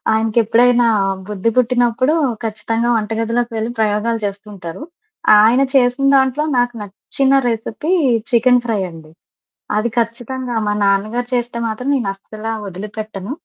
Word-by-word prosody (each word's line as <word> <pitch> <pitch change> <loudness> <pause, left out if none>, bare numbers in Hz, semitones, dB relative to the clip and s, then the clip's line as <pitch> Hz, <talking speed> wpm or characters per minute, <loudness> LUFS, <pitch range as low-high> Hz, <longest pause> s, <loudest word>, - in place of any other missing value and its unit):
ఆయనకెప్పుడైనా 230 +2 +3 0.4
బుద్ధి 210 +2 -1
పుట్టినప్పుడూ 250 +3 +2 0.3
ఖచ్చితంగా 225 +2 -2
వంట 215 0 -2
గదిలోకి 235 +1 -1
వెళ్లి 220 +1 -2
ప్రయోగాలు 220 +2 0
చేస్తుంటరు. 200 - -7 0.6
ఆయన 235 +5 +4
చేసిన 250 +1 +3
దాంట్లో 265 +2 +2
నాకు 245 0 +1
నచ్చిన 265 +7 -1
రెసిపీ 230 - -3 0.4
చికెను 245 0 +4
ఫ్రై 225 -3 0
అండి. 160 -2 -13 0.7
అది 225 +3 0
ఖచ్చితంగా 240 +2 -2
మా 205 - +1
నాన్నగారు 215 +5 0
చేస్తే 240 -1 -1
మాత్రం 235 +5 -4
నేనస్సలా 215 0 -4 0.2
ఒదిలిపెట్టను, 210 +2 -7
230 Hz, 115 wpm, -18 LUFS, 210-245 Hz, 0.7 s, ఆయన